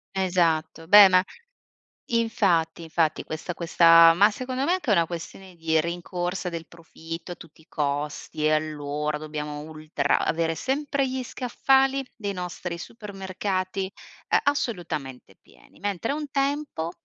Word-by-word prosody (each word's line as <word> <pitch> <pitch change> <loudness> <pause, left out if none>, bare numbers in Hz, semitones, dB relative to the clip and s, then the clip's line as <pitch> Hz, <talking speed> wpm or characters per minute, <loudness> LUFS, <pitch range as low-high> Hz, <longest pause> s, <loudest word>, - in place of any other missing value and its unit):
Esatto. 170 -4 0
Beh 205 +2 +10
ma 185 -1 +4 0.9
infatti, 190 -8 +1
infatti 160 -1 0
questa 160 +3 -5
questa 165 -1 +6
ma 200 +5 +5
secondo 255 +4 -3
me 340 - +1
è - - +4
anche 355 -11 -1
una 170 -4 +3
questione 180 +2 -8
di 160 -1 +1
rincorsa 175 +2 -3
del 165 -2 -6
profitto 165 +1 -9
a - - -5
tutti 160 -1 -16
i 160 - -25
costi 150 +1 -3
e 155 - +4
allora 150 -1 -1
dobbiamo 150 -1 -5
ultra 155 -2 -1
avere 165 0 0
sempre 275 - -1
gli 260 0 -3
scaffali 270 +2 +1
dei 205 -4 -4
nostri 180 -1 -5
supermercati, 190 -1 -4 0.4
ehm, - - +3
assolutamente 170 - -3
pieni, - - -22
mentre 205 +3 -2
un 295 0 -4
tempo 275 - -1
175 Hz, 135 wpm, -25 LUFS, 160-210 Hz, 0.9 s, Beh